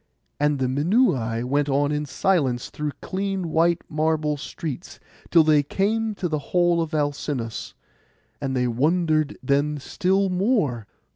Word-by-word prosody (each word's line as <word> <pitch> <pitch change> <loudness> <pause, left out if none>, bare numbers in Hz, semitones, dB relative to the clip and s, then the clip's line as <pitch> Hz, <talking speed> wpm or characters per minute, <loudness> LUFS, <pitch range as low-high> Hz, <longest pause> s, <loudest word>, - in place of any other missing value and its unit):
And 145 0 +2
the 130 - 0
Minuai 130 - +1
went 140 +3 0
on 140 +1 +2
in 150 0 -2
silence 135 -8 0
through 150 -1 -3
clean 190 -2 -2
white 170 +2 +2
marble 155 -1 0
streets, 155 +2 -7 0.3
till 165 -2 +6
they 155 -1 +4
came 215 +8 -1
to 185 - -2
the 155 -2 -1
hall 175 +3 +2
of 165 -1 -3
Alcinous, 145 -6 -3 0.7
and 135 -2 -2
they 125 -1 +1
wondered 155 +4 +1
then 145 +3 +1
still 190 +7 0
more. 180 - 0
150 Hz, 140 wpm, -24 LUFS, 140-175 Hz, 0.7 s, till